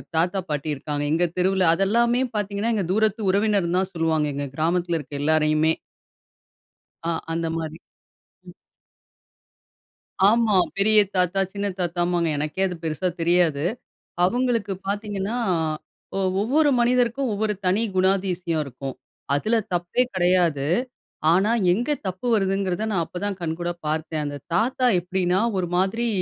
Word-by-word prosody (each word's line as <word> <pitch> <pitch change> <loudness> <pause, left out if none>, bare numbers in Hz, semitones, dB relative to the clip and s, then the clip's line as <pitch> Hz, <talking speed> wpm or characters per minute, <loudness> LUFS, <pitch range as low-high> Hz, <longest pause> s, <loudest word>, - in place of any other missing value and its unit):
தாத்தா 175 +4 +1
பாட்டி 150 0 -2
இருக்காங்க. 145 +1 -3
எங்க 165 +3 +2
தெருவுல 190 +1 +2
அத 170 - +1
எல்லாமே 235 +4 +2
பாத்தீங்கன்னா, 205 +2 -1
எங்க 200 -4 0
தூரத்து 220 +1 +1
உறவினர்ன்னு 200 -3 +1
தான் 190 0 -2
சொல்லுவாங்க. 160 -2 +1
எங்க 140 0 -3
கிராமத்தில 170 +2 0
இருக்கிற 145 -1 -7
எல்லாரையுமே. 155 +1 +3 1.3
ஆ, 170 - +1 0.2
அந்த 165 0 -1
மாரி. 160 -1 -5 0.7
ம். - - -11 1.7
ஆமா. 225 +1 +4 0.2
பெரிய 215 +2 +5 0.2
தாத்தா 180 +1 +2
சின்ன 200 0 -3
தாத்தாமாங்க. 175 -1 0
எனக்கே 150 +5 -3
அது 180 - -5
பெருசா 160 +3 -1
தெரியாது. 165 -4 +2 0.6
அவுங்களுக்கு 230 -1 0
பாத்தீங்கன்னா 205 +2 -2 0.8
ஒ - - 0 0.2
ஒவ்வொரு 290 +8 +3
மனிதருக்கும் 245 +2 +2
ஒவ்வொரு 210 +1 0
தனி 190 +5 +2
குணாதிசயம் 185 -3 +1
இருக்கும். 135 0 -7 0.4
அதில 215 +11 +1 0.2
தப்பே 175 +7 0
கெடையாது. 175 -6 +2 0.7
ஆனா 195 +5 +3 0.2
எங்கே 245 +9 0
தப்பு 185 +6 -4
வருதுங்கிறத 195 0 0
நான் 180 -5 +1
அப்பதான் 195 +3 -4
கண்கூடா 175 +1 -2
பார்த்தேன். 155 0 -2
அந்த 145 0 -4 0.2
தாத்தா 250 +6 +1
எப்டின்னா, 180 +1 0 0.2
ஒரு 180 -2 0
மாதிரி 195 +6 +1
185 Hz, 125 wpm, -23 LUFS, 165-205 Hz, 1.7 s, பெரிய